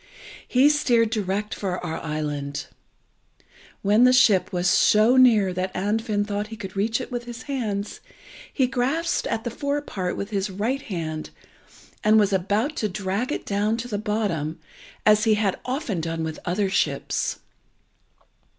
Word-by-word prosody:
He 260 +3 +5
steered 240 -7 +3
direct 210 0 -2
for 185 -3 -3
our 160 -1 -3
island. 145 -2 -3 1.2
When 210 +4 +4
the 255 - +7
ship 205 -7 +4
was 180 -1 0
so 215 +6 +5
near 220 -7 +5
that 185 +1 -2
Andfind 205 +1 0
thought 205 0 -3
he 225 - -8
could 195 -3 -8
reach 220 +4 0
it 255 - -7
with 240 -1 -4
his 240 +1 -8
hands, 215 -7 -3 0.5
he 265 - +2
grasped 270 +7 0
at 225 0 -2
the 240 - -3
fore 285 +4 -1
part 185 -10 -4
with 200 +2 -5
his 200 0 -1
right 220 +8 -2
hand, 160 -7 -5 0.7
and 215 +1 +5
was 205 -1 +2
about 205 - 0
to 215 - 0
drag 200 +6 -2
it - - -3
down 210 +2 0
to 235 +1 -5
the 205 -4 -3
bottom, 200 -8 -2 0.5
as 215 0 +5
he 220 -1 +4
had 205 -3 0
often 250 - -2
done 165 0 -3
with 160 -1 -4
other 195 +3 0
ships. 190 - -1
210 Hz, 160 wpm, -24 LUFS, 190-240 Hz, 1.2 s, the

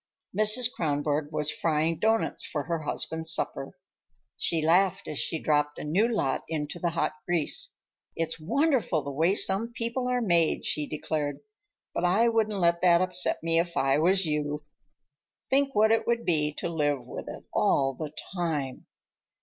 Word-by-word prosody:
Mrs. 215 +4 +4
Kronborg 145 - -1
was 150 -1 0
frying 160 +1 0
doughnuts 225 +3 +1
for 150 -3 -3
her 165 +3 -2
husband's 160 +1 -3
supper. - - -3 0.6
She 165 - +2
laughed 190 +4 +2
as 150 - -3
she 160 - 0
dropped 150 -1 0
a - - -6
new 180 +10 +2
lot 210 - -1
into 155 +1 -4
the 170 - 0
hot 170 0 -1 0.2
grease. 170 -4 -1 0.4
"It's 165 0 -2
wonderful, 230 - +1
the 140 - -5
way 165 +7 +2
some 215 +5 +2
people 235 +2 -2
are 250 0 +1
made," 170 -8 +2
she 150 -1 +1
declared. 150 -2 -3 0.5
"But - - -2
I 210 +7 +3
wouldn't 220 -2 0
let 170 -1 +2
that 175 -2 +5
upset 180 -7 -1
me 165 0 +3
if 170 0 -2
I 135 +1 +2
was 185 +3 +3
you. 150 -1 -2 0.9
Think 275 0 +2
what 220 +1 +4
it 225 - +1
would 235 0 0
be 150 -3 +2
to - - -3
live 145 -6 -1
with - - -7
it - - -8
all 135 -1 +2
the 150 +2 -6 0.2
time. 155 -8 -3
165 Hz, 165 wpm, -27 LUFS, 150-200 Hz, 0.9 s, that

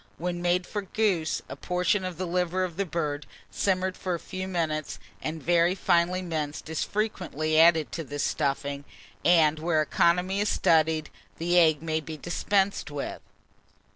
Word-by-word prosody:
When 175 +1 -3
made 175 +1 +1
for 205 - -3
goose, 195 -5 0
a - - -7
portion 180 +2 0
of 185 -3 -4
the 185 - -2
liver 180 +1 0
of 175 -3 -4
the 195 +1 -2
bird, 150 -4 -3 0.2
simmered 185 -1 0
for 185 -2 -2
a - - -5
few 185 +2 -6
minutes 155 - -2 0.2
and 155 -1 -4
very 175 +2 +3
finely 180 0 +2
minced, 155 -3 -4
is 160 - -1
frequently 165 -7 -1
added 160 -2 +5
to 165 - -4
this 145 0 -4
stuffing; 140 0 -1 0.4
and 160 -3 +4
where 160 0 +1
economy 180 +5 +2
is 205 0 +1
studied, 160 -1 +2 0.3
the 175 +2 +3
egg 160 -3 +4
may 160 -1 0
be 155 0 -7
dispensed 195 +4 0
with. 145 -1 -5
170 Hz, 165 wpm, -27 LUFS, 155-185 Hz, 0.4 s, added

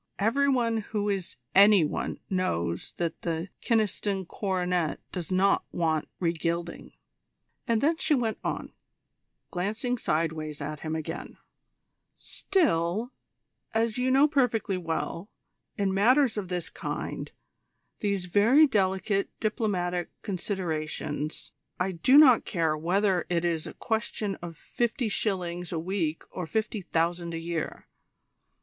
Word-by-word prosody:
Every 265 +7 +2
one 235 -4 +2
who 210 -1 -2
is 195 -3 -2 0.2
any 200 -3 +7
one - - -3
knows 85 - -1
that 170 -2 -2
the 165 +2 -2
Kyneston 205 -3 +1
coronet 180 -5 -1
does 180 -1 -5
not 195 +2 +3
want 160 -3 0
re 170 -2 +1
gilding." 170 +1 -3 0.7
And 230 -1 +2
then 320 +3 +3
she 315 -2 +2
went 230 -4 -1
on, - - -3 0.8
glancing 220 +7 -1
sideways 155 -3 -1
at 150 +1 -5
him 155 +1 -3
again: 160 +1 -5 0.8
"Still, 225 - 0 0.6
as 225 +1 +1
you 255 +1 +2
know 270 +3 +6
perfectly 245 -9 +1
well, 170 +2 -3 0.5
in 200 -2 +1
matters 245 +6 +4
of 205 -3 -3
this 180 -2 -3
kind, - - -4 0.7
these 200 -3 -1
very 220 - +6
delicate 195 -4 +1
diplomatic 185 -6 -1
considerations, 160 -6 -3 0.3
I 185 +1 +1
do 185 - +5
not 265 -6 +8
care 165 -4 0
whether 180 +3 +1
it 175 -1 +1
is 165 -2 -1
a - - -8
question 220 -2 -2
of 170 -2 -7
fifty 240 +3 -1
shillings 180 -4 -2
a 170 - -2
week 165 -2 -2
or 180 -3 -5
fifty 220 +1 -1
thousand 170 0 -1
a - - -2
year. 165 -1 -4
190 Hz, 130 wpm, -28 LUFS, 170-220 Hz, 0.8 s, not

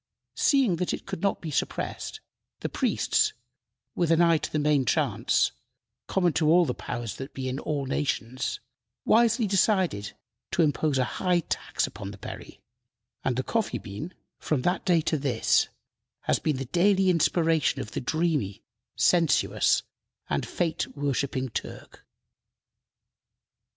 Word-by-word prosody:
Seeing 260 - +3
that 180 - -1
it - - -13
could - - -5
not 200 - 0
be 160 - -5
suppressed, - - -3 0.4
the - - -2
priests, - - +1 0.6
with 170 -3 0
an 165 0 +4
eye 170 -2 +5
to 155 - -5
the - - 0
main 150 -2 +3
chance 120 - +1 0.6
common 180 -4 +2
to 165 +4 +4
the 125 - -1
powers 120 -5 -5
that 135 +2 -8
be 130 -1 -3
in 130 +2 -3
all 145 -3 -2
nations 130 -2 -2 0.5
wisely 230 +1 +4
decided 185 - +1 0.4
to 170 - +4
impose 150 -1 +1
a 130 - +3 0.2
high 180 -2 +3
tax - - -2
upon 100 -1 -7
the 100 - -9
berry, - - -9 0.6
and 130 - 0
the 130 - -1
coffee 220 - -1
bean, 105 - -7 0.2
from 140 -5 -1
that 180 +1 0
day 175 -4 +4
to 155 -1 0
this, 130 -5 +2 0.5
has - - +1
been 150 -4 0
the 135 - -4
daily 190 +6 +3
inspiration 165 -2 +2
of 105 - -5
the - - -3
dreamy, 150 - -1 0.3
sensuous, 170 -3 +3 0.4
and - - -1
fate 170 -2 -1
worshiping 140 -2 -1
Turk. - - -7
155 Hz, 145 wpm, -27 LUFS, 130-175 Hz, 0.6 s, eye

